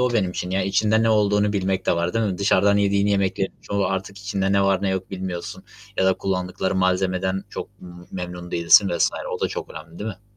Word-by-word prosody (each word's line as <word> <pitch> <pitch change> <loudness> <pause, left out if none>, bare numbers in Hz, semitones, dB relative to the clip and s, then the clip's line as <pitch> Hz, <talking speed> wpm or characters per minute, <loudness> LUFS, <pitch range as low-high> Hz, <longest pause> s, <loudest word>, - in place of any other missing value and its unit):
o 125 -1 +2
benim 100 -6 +1
için. 90 0 -4
Yani, 95 +1 0
içinde 110 +3 +2
ne 115 - +3
olduğunu 105 -1 +2
bilmek 95 -2 -1
de - - +2
var, 85 +3 -1
değil 115 - +1
mi? 95 -4 -2
Dışarıdan 100 0 +3
yediğin 100 0 +2
yemeklerin 95 -1 0
çoğu 100 -1 -1
artık 95 +1 -4
içinde 100 -1 -1
ne 100 0 +3
var 95 -1 +2
ne 100 - +1
yok 95 0 -3
bilmiyorsun 95 -2 -6 0.3
ya - - +2
da 95 0 +4
kullandıkları 95 0 -2
malzemeden 95 0 0
çok - - -8
me 90 - -11 0.2
memnun 90 -1 -6
değilsin 85 +4 +5
vs. 85 -1 +2 0.3
O - - -15
da - - +1
çok - - -6
önemli, 85 +1 -11
değil 110 +2 -3
mi? 100 0 -13
95 Hz, 220 wpm, -23 LUFS, 90-100 Hz, 0.3 s, değilsin